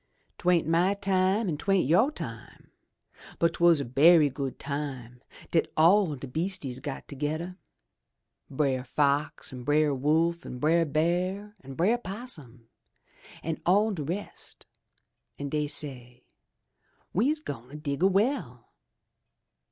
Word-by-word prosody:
" - - -43
Twa'n't 175 -3 +3
my 175 +5 +2
time 195 +2 +1
an' 155 -4 -1
'twa'n't 195 -3 +2
you' 180 - +4
time, 305 - -9 0.7
but 170 0 +2
'twas 170 -2 +4
a - - -3
berry 150 +4 +5
good 135 0 -4
time 135 -4 -5 0.3
dat 165 - +1
all 170 0 +5
de 135 - -8
beastises 150 -2 -3
got 140 -1 -6
togeder 155 +5 -4 0.5
— - - -54
Brer 135 -4 +1
Fox 140 +2 0
an' 125 -1 -7
Brer 150 +2 +2
Wolf 160 +5 +1
an' 125 - -7
Brer 165 +5 +3
Bear 180 +7 -1
an' 135 0 -9
Brer 210 - +2
'Possum 165 - -8 0.8
an' 160 -1 -3
all 205 +5 +3
de 180 -7 -4
rest, 180 +8 -6 0.7
an' 140 0 -4
dey 150 0 -1
say, 125 -4 -2 0.9
*We's 280 - +2
gwine 135 - -8
dig 145 -1 -4
a 190 - +6
well!' 195 - -1
155 Hz, 135 wpm, -28 LUFS, 140-185 Hz, 0.9 s, a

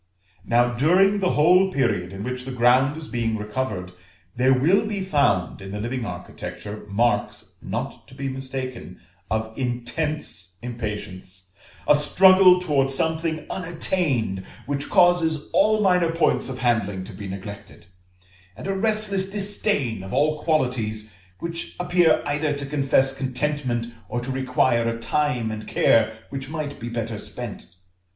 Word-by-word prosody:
Now 120 +1 +2
during 185 +10 +4
the 185 -2 +1
whole 180 +5 +5
period 95 - 0
in 95 +1 -6
which 125 +1 -4
the 130 - -6
ground 130 +4 +3
is 160 -1 -7
being 115 -2 -1
recovered, 105 -4 -4 0.4
there 130 +2 +3
will 150 +11 +4
be 205 -2 -3
found 140 - +1
in 95 - -8
the 105 +1 -5
living 120 +1 -3
architecture 105 0 -7
marks 105 0 0
not - - -5
to 130 - -15
be 135 0 -4
mistaken, 130 -1 -6 0.3
of 110 +1 -2
intense 125 - -3
impatience; 105 -6 -6 0.4
a - - +7
struggle 185 +5 +6
towards 135 -6 +1
something 160 0 -1
unattained, 160 - 0 0.2
which 140 0 -3
causes 170 -4 +3
all 215 +1 +4
minor 180 -4 +3
points 165 -4 +1
of 130 - -5
handling 110 -6 0
to - - -10
be 100 - -7
neglected; 95 -2 -9 0.7
and - - -8
a 195 - -1
restless 205 -2 +1
disdain 195 - 0
of 95 +1 -8
all 155 +4 +1
qualities 115 - -1 0.2
which 170 0 -6
appear 175 -1 +3
either 145 +1 0
to 140 -1 -4
confess 135 -1 +2
contentment 130 -2 -2 0.2
or 120 - -2
to 125 +2 -4
require 125 -3 +1
a 115 - -3
time 125 -2 0
and 110 0 -6
care 110 -1 +3
which 135 0 -5
might 150 -2 -5
be 120 - -5
better 115 -2 -4
spent. 105 -3 -7
130 Hz, 145 wpm, -23 LUFS, 115-160 Hz, 0.7 s, a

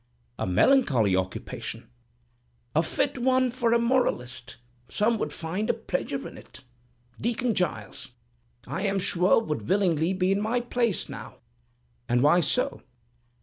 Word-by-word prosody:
"A - - -1
melancholy 120 - +4
occupation." 95 0 -4 0.9
"A 160 - +5
fit 275 - -1
one 255 0 +2
for 240 -2 0
a 235 - +5
moralist. 135 - 0 0.3
Some 220 +2 +1
would 150 - -2
find 170 +8 -3
a - - +2
pleasure - - -3
in - - -11
it. - - -14 0.6
Deacon 235 +1 0
Giles, 135 - -3 0.6
I - - -4
am 200 -1 0
sure, 180 +1 +4
would 155 -8 -4
willingly 180 -3 +2
be 185 0 +1
in 195 +1 +1
my 225 +3 +1
place 240 -3 -1
now." - - -9 0.7
"And 120 +1 +3
why 150 +5 +5
so?" 170 - 0
195 Hz, 140 wpm, -26 LUFS, 150-235 Hz, 0.9 s, A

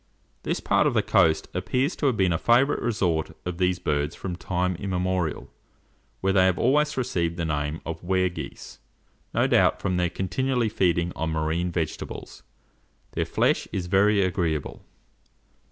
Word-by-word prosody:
This - - -2
part - - +2
of - - 0
the - - +3
coast 80 -1 +3
appears 135 +7 0
to 145 - +1
have 125 -5 +1
been 95 -3 +3
a 80 - -1
favourite 125 +5 +3
resort 90 -9 -1
of 90 0 -4
these 90 -1 +2
birds 75 -2 -1
from 90 -2 -5
time 90 0 -1
immemorial, 90 -3 -2 0.7
where 95 0 +1
they 95 -1 +5
have 90 -2 +1
always 150 +4 +2
received 85 -9 -1
the 85 - -1
name 75 0 -2
of 85 +1 -6
Ware 95 0 +2
geese, 90 - -9 0.5
no - - +2
doubt - - +3
from 95 -2 -1
their 90 -1 +1
continually 120 +7 -1
feeding 85 -4 +1
on 80 - -2
marine 80 +3 -1
vegetables. 80 -3 -5 0.7
Their - - -1
flesh - - +1
is 90 - -3
very 100 +2 +3
agreeable. 85 -4 -2
90 Hz, 160 wpm, -25 LUFS, 85-100 Hz, 0.7 s, they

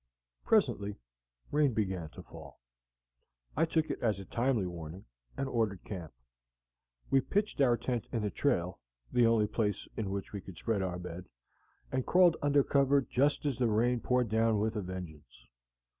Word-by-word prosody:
Presently 100 +9 +2 0.6
rain 145 -5 +3
began 95 -6 -1
to - - -9
fall. - - -12 1.0
I 160 - +3
took 160 -1 0
it - - -5
as 110 -5 +1
a 95 - -8
timely 120 -3 0
warning, 85 +1 -7 0.3
and 135 - -1
ordered 110 -7 -1
camp. 90 -6 -7 1.0
We 135 0 +5
pitched 205 0 -1
our 120 -3 +4
tent 120 -3 -2
in 115 -3 -1
the 105 - -1
trail, 90 -11 0 0.3
the 120 -1 +4
only 115 -2 +4
place 105 -1 -1
in 105 -3 -2
which 100 +1 -4
we 100 - -4
could 90 -3 -11
spread 110 0 -1
our 90 -2 -2
bed, 90 0 -8 0.6
and 130 0 0
crawled 180 +1 +5
under 145 -1 +4
cover 140 0 +3
just 140 +4 +1
as 135 -3 -1
the 125 - +3
rain 120 +3 +2
poured 125 -1 +1
down 110 0 +2
with 110 +2 0
a 105 - -1
vengeance. 85 -9 -9
110 Hz, 170 wpm, -32 LUFS, 95-130 Hz, 1.0 s, We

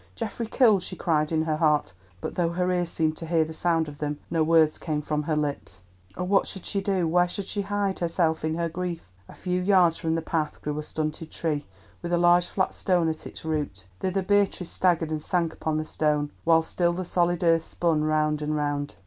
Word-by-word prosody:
Geoffrey 225 0 -4
killed!" 220 -5 +4
she 185 - -5
cried 155 -3 0
in 160 -1 +1
her 155 -1 -1
heart; 150 - +2 0.3
but - - -4
though 170 -2 +1
her 180 +1 0
ears 175 -2 0
seemed 160 -2 +1
to 165 - -7
hear 165 -1 +2
the 160 - -8
sound 165 -1 +1
of 145 -1 -10
them, 150 -1 -2
no 165 -1 +1
words 160 -1 +4
came 155 -3 -2
from 150 0 -2
her 155 +1 -1
lips. 140 -11 -3 0.3
"Oh, - - -2
what 195 +2 +2
should 195 - -4
she 200 - -1
do? 190 -3 0
Where 175 +2 +3
should 195 +2 -4
she 205 - -2
hide 200 -1 -1
herself 165 -2 0
in 155 0 0
her 170 0 -1
grief?" 170 - -5 0.2
A - - -12
few 180 0 -2
yards 180 -3 +4
from 160 0 -1
the 165 - -2
path 160 -2 -2
grew 150 0 -2
a - - -2
stunted 155 +1 -4
tree 150 -3 -2 0.3
with 175 - -4
a 175 - +3
large 175 0 +4
flat 185 - -1
stone 175 -3 +1
at 155 - -5
its - - -11
root. 145 -12 -3
Thither 190 +1 -1
Beatrice 200 -2 +1
staggered 170 -3 +1
and 155 -1 -2
sank 170 0 0
upon 155 -1 -2
the 155 - -2
stone, 150 -2 0
while 165 -1 +5
still 175 +1 +1
the 185 +1 -4
solid 175 0 +1
earth 165 -1 +4
spun 165 -2 0
round 155 0 +1
and 150 0 -1
round. 145 -1 -2
165 Hz, 225 wpm, -26 LUFS, 155-180 Hz, 0.3 s, while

